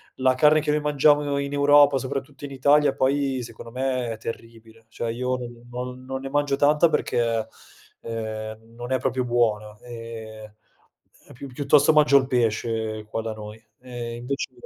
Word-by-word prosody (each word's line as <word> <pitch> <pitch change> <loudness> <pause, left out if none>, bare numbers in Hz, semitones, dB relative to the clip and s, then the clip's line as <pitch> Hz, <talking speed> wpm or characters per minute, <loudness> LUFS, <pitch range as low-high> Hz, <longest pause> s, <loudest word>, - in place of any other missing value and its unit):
la 130 0 +2
carne 150 +3 +5
che 150 0 -1
noi 150 - +1
mangiamo 145 -1 +3
in 140 0 -3
Europa, 145 -1 +5
soprattutto 135 +1 -5
in 145 - -6
Italia 140 +1 +3
poi, 135 -1 0
secondo 115 0 -10
me 130 -1 -2
è 110 - -5
terribile, 115 0 -10
cioè 115 +1 -4
io 125 +2 -2
non 120 -1 -10
non 125 +1 -6
non 130 0 -4
ne 135 - -6
mangio 145 0 +1
tanta 150 +3 +4
perché, 115 -6 0 0.5
ehm, 110 0 -6
non 120 +2 -4
è 130 - +1
proprio 130 -1 -1
buona, 110 -3 0
ehm, 110 -3 -9 0.7
e - - -14
pi 140 +3 -9
piuttosto 140 +3 +3
mangio 150 -2 +4
il 130 -1 +1
pesce 110 -3 -1
qua 115 - -3
da 110 -1 -4
noi. 105 +1 -10 0.2
E 120 -2 -6
invece 130 +3 -4
125 Hz, 170 wpm, -24 LUFS, 115-140 Hz, 0.7 s, carne